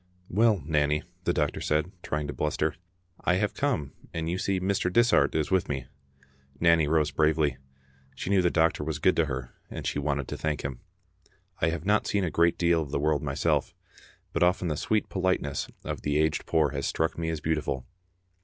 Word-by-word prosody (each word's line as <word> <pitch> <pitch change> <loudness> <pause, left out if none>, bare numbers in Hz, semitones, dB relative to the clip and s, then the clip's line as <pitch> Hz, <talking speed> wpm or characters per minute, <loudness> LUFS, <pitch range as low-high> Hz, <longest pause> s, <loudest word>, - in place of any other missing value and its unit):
" 90 - -33
Well, 110 -8 +4
Nanny," 75 0 +1 0.2
the - - +3
doctor 75 -4 0
said, 75 +4 0
trying 75 -3 -2
to 70 - -4
bluster, 75 +1 0 0.3
" 90 0 -29
I 90 - +3
have 105 +3 0
come, 125 - -1 0.2
and 80 0 -2
you 90 +2 -1
see 95 -1 0
Mr. 95 -1 0
Dishart 120 +2 +4
is 80 +2 0
with 95 -1 +2
me." 65 -3 -2 0.7
Nanny 85 -2 +4
rose 75 -2 +2
bravely. 75 -3 +2 0.6
She 95 - -4
knew 100 -2 +5
the 90 - +3
doctor 80 -2 +2
was 80 0 -2
good 95 - +3
to 85 - +4
her, 65 -4 -5 0.2
and - - -6
she - - -1
wanted 70 -2 -1
to - - -4
thank 75 -2 -2
him. 65 -3 -4 0.8
I 80 - +3
have 80 0 -4
not 105 +1 +2
seen 100 -1 +1
a 85 - -1
great 85 0 +3
deal 85 -1 +3
of 75 - -5
the 75 - -1
world 75 0 +1
myself, - - 0 0.6
but - - -1
often 90 0 +3
the 75 - -1
sweet 110 +8 0
politeness 95 -7 -1 0.2
of - - -4
the 75 0 0
aged 80 0 +1
poor 80 -2 +3
has 70 -1 -2
struck 80 0 0
me 80 -1 -1
as 80 -1 -2
beautiful. 75 -5 -1
80 Hz, 205 wpm, -28 LUFS, 75-90 Hz, 0.8 s, knew